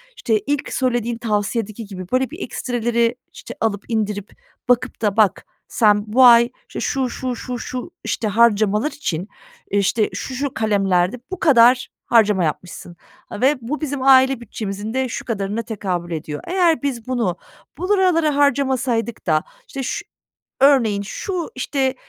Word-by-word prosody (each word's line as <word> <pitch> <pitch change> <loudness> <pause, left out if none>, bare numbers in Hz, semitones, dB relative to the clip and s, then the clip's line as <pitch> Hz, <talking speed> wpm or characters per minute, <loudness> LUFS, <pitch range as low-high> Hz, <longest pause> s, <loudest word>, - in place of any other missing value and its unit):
işte, 220 - 0
ilk 290 -1 -1
söylediğin 240 -3 0
tavsiyedeki 215 0 -2
gibi, 185 -2 -8
böyle, 260 0 +1
bir 325 - -10
ekstreleri, 235 -1 -1 0.2
işte, - - -10
alıp 205 -3 0
indirip 210 -3 -2 0.4
bakıp 245 0 +1
da 210 -1 0
"Bak, 205 -3 +3 0.3
sen 210 -2 +3
bu 250 +5 +4
ay, 235 0 +7 0.2
işte, - - -7
şu 265 -3 -1
şu 255 0 -4
şu 250 0 -5
şu, 250 -1 -6
işte, 220 - -2
harcamalar 215 +3 +3
için, 185 - -4 0.4
eee, 200 - +2
işte, 210 +2 +1
şu 265 - -5
şu 280 0 -2
kalemlerde 195 -1 +1
bu 375 - -5
kadar 250 -3 +5 0.2
harcama 210 -5 +3
yapmışsın. 170 +2 -5 0.3
Ha, - - -7
ve 275 +4 +4
bu 295 +7 -4
bizim 285 -3 -3
aile 265 -1 +5
bütçemizin 210 -1 -5
de 260 -1 0
şu - - -5
kadarına 210 0 -2
tekabül 185 -6 -4
ediyor. 155 -2 -5
Eğer 350 -4 +2
biz 255 -5 -3
bunu 230 -9 -1 0.4
buralara 360 -4 +2
harcamasaydık 260 -4 0
da, 155 -2 +2 0.2
işte, 270 -2 -5
şu 415 +10 -4 0.6
örneğin 235 -8 +4
şu, 345 - -4
işte, 265 0 -1
235 Hz, 150 wpm, -20 LUFS, 205-265 Hz, 0.6 s, ay